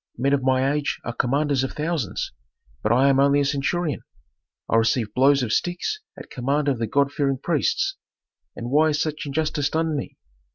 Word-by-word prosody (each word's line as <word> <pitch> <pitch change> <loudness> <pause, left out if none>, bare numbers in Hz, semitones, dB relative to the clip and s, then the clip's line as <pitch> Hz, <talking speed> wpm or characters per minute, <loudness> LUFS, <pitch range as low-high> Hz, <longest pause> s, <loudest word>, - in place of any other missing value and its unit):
Men 135 +3 +1
of 140 - +2
my 130 +1 +2
age 150 -1 -2
are 120 - -4
commanders 140 +3 +1
of 135 - -3
thousands, 150 - -2 0.5
but 110 - 0
I 130 +3 +4
am 135 0 +3
only 140 +1 +4
a 140 - +2
centurion. 145 +2 -1 0.7
I 115 - +2
receive 115 -1 +1
blows 135 +2 +4
of 110 - -1
sticks 175 - -1 0.2
at - - -11
command 140 +4 -1
of 135 -4 +1
the 115 - -1
god 140 +4 +2
fearing 140 -2 0
priests. 380 - 0 0.6
And 120 +1 -6
why 155 +3 +4
is 150 -1 0
such 155 -1 -2
injustice 150 0 -1
done 160 0 0
me? 140 - -5
140 Hz, 190 wpm, -23 LUFS, 130-150 Hz, 0.7 s, I